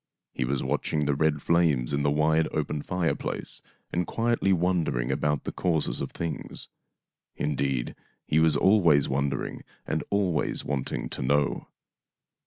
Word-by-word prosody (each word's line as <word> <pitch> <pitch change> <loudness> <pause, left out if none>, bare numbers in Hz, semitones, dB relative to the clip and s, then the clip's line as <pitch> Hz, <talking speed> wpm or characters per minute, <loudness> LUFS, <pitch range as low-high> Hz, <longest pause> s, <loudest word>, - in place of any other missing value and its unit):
He 65 - -1
was 65 +2 -1
watching 75 -1 0
the 70 - +2
red 75 0 +1
flames 75 -7 +2
in 70 - +1
the 70 - +2
wide 80 +2 +3
open 75 -1 -2
fireplace 90 +1 -2 0.3
and 85 -1 0
quietly 115 -4 +1
wondering 85 -9 +1
about 75 +1 0
the - - -3
causes 80 -8 0
of - - -3
things. 80 -4 -5 0.7
Indeed, 70 -4 -1 0.3
he 75 - +2
was 80 -2 +4
always 85 -7 +5
wonder 70 +1 0
ing - - -7 0.2
and 80 - -1
always 95 -6 0
want 70 -3 -2
ing - - -3
to - - -4
know. 70 +3 +1
75 Hz, 150 wpm, -27 LUFS, 70-85 Hz, 0.7 s, always